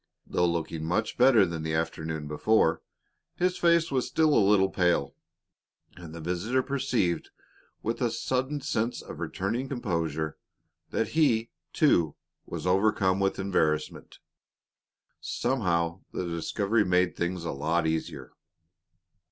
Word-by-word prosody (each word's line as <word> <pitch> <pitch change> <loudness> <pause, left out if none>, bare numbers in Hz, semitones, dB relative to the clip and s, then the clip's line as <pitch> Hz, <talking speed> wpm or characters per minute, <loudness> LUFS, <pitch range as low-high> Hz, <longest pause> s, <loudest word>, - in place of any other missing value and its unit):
Though 90 0 +1
looking 85 -1 -2
much 90 +7 -1
better 120 -5 +6
than 85 -3 -4
he 80 - -3
had - - +2
the - - +3
afternoon 80 -2 -4
before, 80 +2 +2 0.5
his 180 0 +1
face 170 -2 +3
was 130 -2 0
still 155 -2 +2
a - - +5
little 95 -2 +4
pale, 90 -6 +1 0.8
and 85 -3 -10
the - - -7
visitor 90 +10 -1
perceived, 130 -11 -1 0.5
with - - -2
a - - +2
sudden 130 +3 -2
sense 120 -4 -2
of - - -9
returning 115 +8 -3
composure, 80 - -2 0.5
that 110 - -1
he, 120 -8 +2 0.2
too, 85 - +3 0.3
was - - -6
overcome 95 0 +2
with 95 0 +1
embarrassment. 80 -6 -1 1.0
Somehow 85 -8 -1
the 90 - -3
discovery 100 +6 0
made 90 -1 +2
things 85 0 -2
a - - -2
lot 80 +4 0
easier. 80 -4 -3
95 Hz, 135 wpm, -28 LUFS, 85-120 Hz, 1.0 s, better